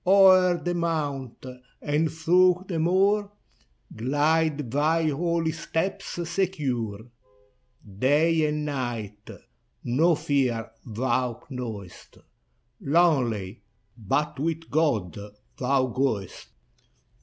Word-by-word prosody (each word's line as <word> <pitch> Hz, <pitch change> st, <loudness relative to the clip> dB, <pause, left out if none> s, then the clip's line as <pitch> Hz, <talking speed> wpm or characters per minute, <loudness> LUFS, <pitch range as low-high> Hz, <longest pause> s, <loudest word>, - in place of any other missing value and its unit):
O'er 185 Hz, -2 st, +6 dB
the 175 Hz, +1 st, -3 dB
mount, 145 Hz, -8 st, -3 dB, 0.3 s
and 150 Hz, +2 st, 0 dB
through 180 Hz, +3 st, +3 dB
the 170 Hz, -4 st, -2 dB
moor, 200 Hz, +5 st, +2 dB, 0.6 s
Glide 145 Hz, +2 st, 0 dB
thy 155 Hz, +4 st, +2 dB
holy 165 Hz, +2 st, 0 dB
steps 185 Hz, +4 st, -3 dB, 0.2 s
secure. 140 Hz, -, -2 dB, 1.0 s
Day 155 Hz, +4 st, +3 dB
and 150 Hz, 0 st, -2 dB
night 120 Hz, -7 st, -5 dB, 0.5 s
no 160 Hz, +8 st, +3 dB
fear 125 Hz, -7 st, -1 dB
thou 120 Hz, +1 st, -2 dB
knowest, 110 Hz, -8 st, -8 dB, 0.6 s
Lonely, 130 Hz, -, +1 dB, 0.2 s
— 110 Hz, 0 st, -43 dB
but 125 Hz, +6 st, -2 dB
with 165 Hz, +2 st, -3 dB
God 130 Hz, -, +1 dB, 0.4 s
thou 130 Hz, +1 st, +2 dB
goest. 120 Hz, -7 st, -2 dB
150 Hz, 90 wpm, -25 LUFS, 120-165 Hz, 1.0 s, O'er